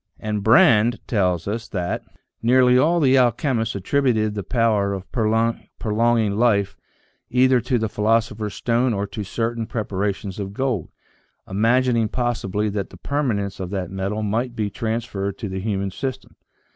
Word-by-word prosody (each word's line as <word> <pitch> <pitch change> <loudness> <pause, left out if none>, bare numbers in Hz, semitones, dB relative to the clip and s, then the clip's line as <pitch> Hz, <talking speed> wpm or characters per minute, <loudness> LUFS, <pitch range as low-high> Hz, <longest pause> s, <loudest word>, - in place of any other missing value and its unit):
And 105 -1 -3
Brande 115 +1 +5
tells 90 -6 0
us 110 +3 -3
that 90 -3 -3 0.2
" - - -54
nearly 125 +1 +4
all 160 +7 +4
the 135 -3 +4
alchemists 120 -2 +1
attributed 110 0 +1
the 105 - -3
power 105 -3 +1
of 95 -1 -6
prolonging 115 -1 0
life 100 -5 +2 0.5
either 125 0 +4
to 125 0 0
the 110 -1 0
philoso 110 +2 +1
pher's 105 -1 -5
stone 120 0 +1
or 100 +1 -1
to 105 +1 -6
certain 115 +3 -2
preparations 100 -4 -3
of 100 -1 -5
gold, 125 - -1 0.6
imagining 115 +3 +2
possibly 105 -4 -1
that 100 -1 -3
the - - -13
permanence 115 -10 -2
of 95 -2 -4
that 95 -3 -4
metal 100 +3 -2
might 120 +4 -1
be 105 -3 -2
trans 115 +2 -2
ferred 100 0 -4
to 110 - -5
the 95 0 -4
human 100 -1 -2
system. 130 +7 -5
110 Hz, 160 wpm, -22 LUFS, 100-120 Hz, 0.6 s, Brande